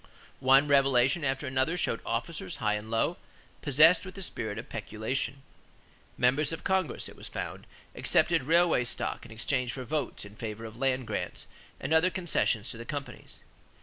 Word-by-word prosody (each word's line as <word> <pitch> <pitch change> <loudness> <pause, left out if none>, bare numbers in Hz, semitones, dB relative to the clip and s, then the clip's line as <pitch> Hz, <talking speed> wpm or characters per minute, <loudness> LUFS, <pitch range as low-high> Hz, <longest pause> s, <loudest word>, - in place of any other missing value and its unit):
One 135 +2 +5
revelation 135 +1 +4
after 135 0 -1
another 130 +6 0
showed 115 - 0
officers, 115 - -3
high 105 -1 0
and 105 +1 -4
low, 115 +10 +1 0.4
possessed 155 +4 +6
with 185 -1 -9
the 195 - -4
spirit 110 - -3
of - - -6
peculation. 135 +5 -3 0.7
Members 135 +6 +3
of 165 - -5
Congress, 190 -4 0
it - - -11
was - - -8
found, - - -6 0.3
accepted 165 -5 +2
railway 165 -3 +4
stock 120 - -2
in - - -15
exchange 125 +3 -1
for 130 - -5
votes 150 -4 -3
in 105 0 -12
favor 110 0 -6
of 110 0 -9
land 130 0 0
grants - - -3 0.3
and 155 - -1
other 160 +3 +5
concessions 160 - 0
to 115 - -6
the 115 - -6
companies. 145 0 -7
135 Hz, 170 wpm, -29 LUFS, 115-160 Hz, 0.7 s, possessed